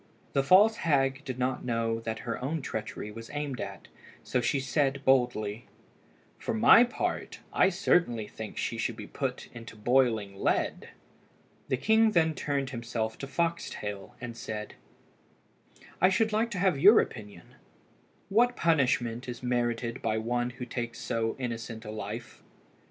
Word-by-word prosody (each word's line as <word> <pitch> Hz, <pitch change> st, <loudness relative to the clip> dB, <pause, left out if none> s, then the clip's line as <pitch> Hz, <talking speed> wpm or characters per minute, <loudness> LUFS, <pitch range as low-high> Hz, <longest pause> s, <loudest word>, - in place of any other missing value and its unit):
The 135 Hz, -, +3 dB
false 200 Hz, +10 st, +6 dB
hag 135 Hz, -3 st, +1 dB
did 130 Hz, -3 st, -4 dB
not 130 Hz, 0 st, -1 dB
know 115 Hz, -1 st, -1 dB
that 110 Hz, -1 st, -4 dB
her 115 Hz, +1 st, -3 dB
own 150 Hz, +2 st, -2 dB
treachery 110 Hz, -2 st, -5 dB
was 115 Hz, +1 st, -9 dB
aimed 145 Hz, -3 st, -3 dB
at, -, -, -7 dB, 0.4 s
so 125 Hz, -, 0 dB
she 135 Hz, +3 st, +1 dB
said 135 Hz, 0 st, 0 dB
boldly 120 Hz, -4 st, +1 dB, 0.7 s
"For -, -, -2 dB
my 170 Hz, -, +8 dB
part, 245 Hz, -, -3 dB
I 190 Hz, -, +5 dB
certainly 170 Hz, -, +1 dB
think 110 Hz, 0 st, -8 dB
she -, -, -2 dB
should -, -, -1 dB
be -, -, -8 dB
put -, -, -4 dB
into 115 Hz, -1 st, -10 dB
boiling 110 Hz, -3 st, +2 dB
lead." -, -, 0 dB, 0.8 s
The 130 Hz, -, 0 dB
king 220 Hz, -, +4 dB
then 160 Hz, -2 st, +3 dB
turned 140 Hz, -2 st, -2 dB
himself 115 Hz, -2 st, -3 dB
to 135 Hz, -, -5 dB
Foxtail, 135 Hz, -10 st, -3 dB
and 120 Hz, -1 st, -6 dB
said 110 Hz, -2 st, -6 dB, 1.3 s
"I 185 Hz, -, +6 dB
should 220 Hz, +3 st, +1 dB
like 225 Hz, +2 st, +2 dB
to 205 Hz, -, -5 dB
have 180 Hz, -6 st, +2 dB
your 205 Hz, +9 st, +8 dB
opinion; 105 Hz, -6 st, -5 dB, 0.8 s
what 245 Hz, +4 st, +3 dB
punishment 125 Hz, -6 st, +1 dB
is 120 Hz, 0 st, -7 dB
merited 120 Hz, -1 st, -1 dB
by 110 Hz, -1 st, 0 dB
one 120 Hz, +2 st, -1 dB
who 125 Hz, 0 st, -7 dB
takes 120 Hz, -1 st, -4 dB
so 115 Hz, -1 st, -2 dB
innocent 115 Hz, -3 st, -5 dB
a 105 Hz, -, -5 dB
life?" 110 Hz, +2 st, -7 dB
125 Hz, 150 wpm, -29 LUFS, 115-145 Hz, 1.3 s, my